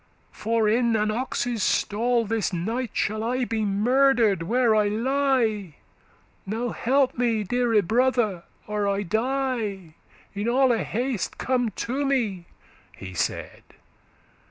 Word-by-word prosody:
for 225 0 0
in 230 +1 +2
an 215 0 +1
ox's 245 -1 -2
stall 230 +5 +1
This 220 0 -1
night 225 +8 -2
shall 215 +1 -1
I 250 +2 0
be 225 -2 -2
murder'd, 225 0 +3
where 230 +6 +2
I 210 -1 +3
lie 230 - 0 0.7
Now 225 +5 -3
help 260 +2 +1
me, 230 -3 +1
deare 230 0 +2
brother, 225 -3 +1 0.2
or 210 -1 -1
I 200 0 0
die; 220 -5 -2 0.4
In 205 +2 -3
alle 250 -2 +3
haste 240 0 -2
come 250 -3 0
to 250 +8 -3
me,' 225 -10 -1 0.5
he 95 -1 -8
said. 90 - -3
225 Hz, 125 wpm, -25 LUFS, 210-250 Hz, 0.7 s, murder'd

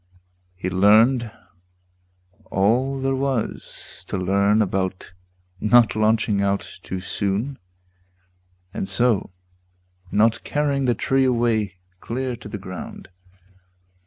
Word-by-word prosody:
He 90 0 -4
learned 110 +6 +4 1.2
all 125 +8 +1
there 135 0 0
was 135 -3 -2
To - - -3
learn 100 +3 +2
about 95 -3 -2 0.5
not 115 +2 +4
launching 110 -1 +2
out 100 0 -2
too 95 0 -5
soon 100 +8 -2 1.1
And - - -3
so 110 +2 +2 0.8
not 110 +2 +2
carrying 140 -2 0
the 120 -2 +2
tree 135 +4 +1
away 115 -6 +1 0.2
Clear 125 +3 -3
to - - -10
the 105 - -5
ground. 95 -2 -9
110 Hz, 100 wpm, -22 LUFS, 100-125 Hz, 1.2 s, learned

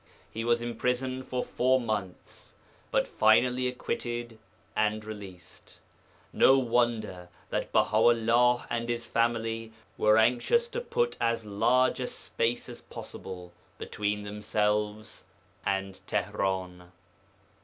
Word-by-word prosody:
He 115 - -4
was 120 0 +2
imprisoned 125 +2 -2
for 125 -1 -1
four 130 +1 +2
months, 105 -6 -5 0.3
but - - +1
finally 125 +4 +3
acquitted 120 -2 -4 0.4
and 110 0 0
released. 100 -4 -11 0.6
No 135 - +6
wonder 115 -7 0 0.2
that - - -2
Baha 110 - +3
'ullah 120 +2 +4
and 115 0 -2
his 120 -1 -2
family 115 -1 -1 0.3
were 105 0 +5
anxious 125 - +3
to 480 0 -3
put 480 0 -1
as 115 -1 0
large 120 +6 +2
a 125 - -2
space 115 +1 -2
as - - -9
possible 90 -2 -9 0.3
between 105 0 -2
themselves 105 +1 -2 0.4
and 95 -1 -2
Tihran. 90 -2 -2
115 Hz, 110 wpm, -29 LUFS, 105-120 Hz, 0.6 s, No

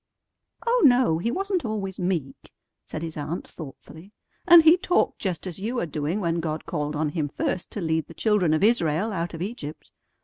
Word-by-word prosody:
"Oh, 480 +1 +3
no, 245 - +5
he 225 - -1
wasn't 385 +5 -1
always 205 -4 -4
meek," 175 -7 -3 0.4
said 155 - -5
his 160 -1 -5
aunt 155 +4 -4
thoughtfully; 160 +4 -11 0.4
"and 340 -2 +9
he 320 +2 +8
talked 360 -1 +1
just 185 -4 -3
as 185 -1 -6
you 235 +5 -2
are - - -1
doing 155 +4 -2
when 170 -3 0
God 155 -1 -3
called 150 -2 -3
on 150 0 0
him 150 -2 -2
first 175 +4 -3
to 205 - -4
lead 160 -2 0
the 165 - -13
children 210 -7 +2
of 155 - 0
Israel 205 -2 +2
out 170 -1 -3
of 165 - -4
Egypt. 185 -8 -7
175 Hz, 195 wpm, -25 LUFS, 160-220 Hz, 0.4 s, and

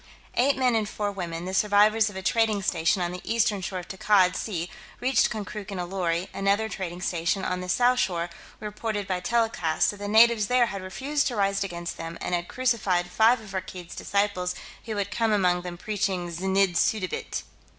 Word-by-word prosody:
Eight 275 +3 +3
men 255 -2 +3
and 215 -2 0
four 205 -1 -2
women, 175 -3 -5
the 185 - -4
survivors 210 +2 +4
of 205 - -11
a 190 - -5
trading 220 -2 +2
station 185 +1 +1
on 175 - -2
the 180 - -7
eastern 215 -3 +1
shore 185 +1 -4
of 180 - -6
Takkad 190 -2 +3
Sea, 175 -6 -3 0.3
reached 250 -3 +3
Konkrook 210 -1 -6
in 195 - -5
a 180 - -2
lorry; 175 -1 -1
another 200 +3 +1
trading 180 -4 -5
station, 180 +2 -1
on 180 0 -1
the 180 - -6
south 250 +5 +3
shore, 175 -4 -1 0.3
reported 210 -1 -3
by 185 -1 -1
telecast 220 -7 +1
that 205 - -11
the 205 0 -5
natives 220 0 +5
there 250 +1 +4
had 200 -4 -5
refused 275 +10 -1
to 245 - -2
rise 195 -1 +1
against 175 -2 -5
them, 165 0 -6
and - - -3
had 175 0 -1
crucified 200 -8 0
five 225 +5 +4
of 205 -3 -11
Rakkeed's 185 -2 -6
disciples 200 -3 -1 0.3
who 220 -2 -4
had 200 0 -2
come 225 -2 +1
among 180 -4 +2
them 175 -1 -7
preaching 190 -3 -2
znidd 190 +1 +1
suddabit. 185 0 -1
195 Hz, 195 wpm, -26 LUFS, 180-215 Hz, 0.3 s, natives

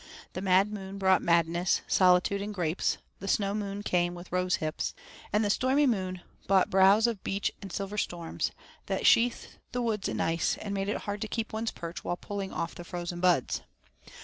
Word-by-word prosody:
The 185 - -4
Mad 195 +2 +3
Moon 195 -1 -6
brought 190 -1 +4
madness, 170 +1 +2
solitude, 185 +2 +4
and 205 +1 -4
grapes; 170 -1 0 0.2
the 195 - -6
Snow 200 0 +1
Moon 205 -1 -3
came 175 -2 +1
with 175 +1 -10
rosehips; 180 -4 -1 0.4
and 210 +1 +2
the - - +1
Stormy 265 +6 +3
Moon 185 -7 -1 0.3
brought 195 +1 +3
browse 195 +3 +6
of 230 -5 -1
birch 195 +1 -1
and 195 -2 -8
silver 200 +2 -3
storms 170 -4 -2 0.4
that - - -1
sheathed 235 +1 +3
the 245 - 0
woods 215 -4 -1
in - - -3
ice, 165 +1 +1
and 205 -2 -4
made 195 0 -1
it - - -2
hard 205 0 -4
to 220 - -2
keep 225 +1 -3
one's 220 +1 -1
perch 170 0 -7
while 175 - -2
pulling 200 0 -5
off 165 - -3
the 175 - -9
frozen 175 0 -5
buds. 175 -7 +2
195 Hz, 190 wpm, -29 LUFS, 175-205 Hz, 0.4 s, browse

